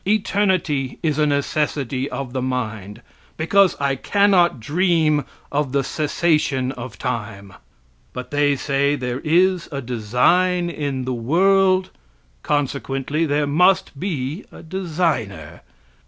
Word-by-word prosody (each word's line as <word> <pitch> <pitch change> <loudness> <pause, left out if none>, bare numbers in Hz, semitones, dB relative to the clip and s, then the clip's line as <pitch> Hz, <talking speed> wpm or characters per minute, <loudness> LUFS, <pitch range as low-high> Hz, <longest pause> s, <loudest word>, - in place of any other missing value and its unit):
Eternity 190 -10 0
is 155 -2 0
a 150 - +3
necessity 140 -2 -1
of 135 -3 -5
the 130 - -2
mind, 110 -4 -4 0.3
because 190 +4 +3
I 140 -1 +1
cannot 185 - +3
dream 155 - +1 0.3
of 140 -2 -1
the 140 -1 +2
cessation 150 -4 0
of 130 -1 -8
time. 105 -6 -5 0.6
But 125 - -7
they 145 0 +2
say 140 +1 0
there 125 -2 -3
is 180 +2 +2
a 140 - -3
design 140 - +1
in 140 -5 -3
the 130 - -2
world, 185 +9 +2 0.5
consequently 145 +2 -1
there 145 0 +1
must 165 0 +2
be 155 -1 -3
a - - -12
designer. 160 - -3
145 Hz, 120 wpm, -21 LUFS, 130-175 Hz, 0.6 s, a